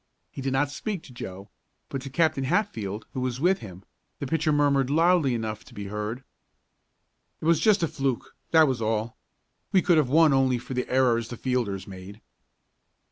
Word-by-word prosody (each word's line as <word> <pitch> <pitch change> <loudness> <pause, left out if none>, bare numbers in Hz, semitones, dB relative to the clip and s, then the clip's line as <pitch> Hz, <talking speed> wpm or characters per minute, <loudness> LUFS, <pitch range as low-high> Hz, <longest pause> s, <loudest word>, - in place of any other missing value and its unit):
He - - -7
did 135 0 -1
not 140 +2 +1
speak 190 +4 -4
to 130 - -13
Joe, 100 -3 -8 0.4
but 135 - -4
to 135 - -7
Captain 155 -2 +1
Hatfield, 115 - -1
who 130 - -3
was 125 -1 -2
with 180 +5 +3
him, 95 -3 -10 0.3
the - - -4
pitcher 160 +2 +1
murmured, 140 -3 +2
loudly 165 -3 +3
enough 110 -2 -4
to - - -16
be 105 - -6
heard: 105 +5 -4 1.2
"It - - -7
was 165 -1 +4
just 210 -5 +3
a - - +3
fluke, 135 -4 -3
that 160 -2 +6
was 130 -4 -1
all. 110 +1 -2 0.5
We 190 - +4
could 175 -3 +4
have 140 -5 +1
won 155 +1 +5
only 130 -2 +3
for 120 +2 -7
the 125 0 -2
errors 120 -3 +2
the 120 - -7
fielders 115 -8 -1
made." 95 +2 -10
130 Hz, 190 wpm, -26 LUFS, 110-155 Hz, 1.2 s, that